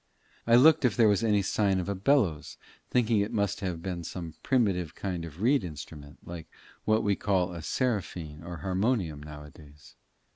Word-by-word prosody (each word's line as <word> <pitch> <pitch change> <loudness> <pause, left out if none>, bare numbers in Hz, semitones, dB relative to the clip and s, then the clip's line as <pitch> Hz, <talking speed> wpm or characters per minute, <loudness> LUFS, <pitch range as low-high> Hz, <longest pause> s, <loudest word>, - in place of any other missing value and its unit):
I 115 - +6
looked 150 +5 +6
if 125 -2 +2
there 115 -2 +6
was 105 +1 +2
any 105 -3 +2
sign 95 -1 +1
of 90 - -3
a 100 - -1
bellows, 95 - +1 0.3
thinking 115 -3 +2
it 100 +1 -1
must 100 -1 -1
have 90 -5 -4
been 90 -3 -4
some 85 -1 -6
primitive 95 - 0
kind 90 -4 -4
of 85 +5 -8
reed 130 -1 +3
instrument, 75 -3 -9
like 85 -2 -8 0.4
what 110 +1 +2
we 100 -2 +2
call 90 -3 0
a 85 - -6
seraphine 90 -9 -2
or 85 +1 -7
harmonium 95 - 0
now 75 0 -9
a 75 - -13
days. 75 -1 -17
95 Hz, 185 wpm, -28 LUFS, 80-110 Hz, 0.4 s, I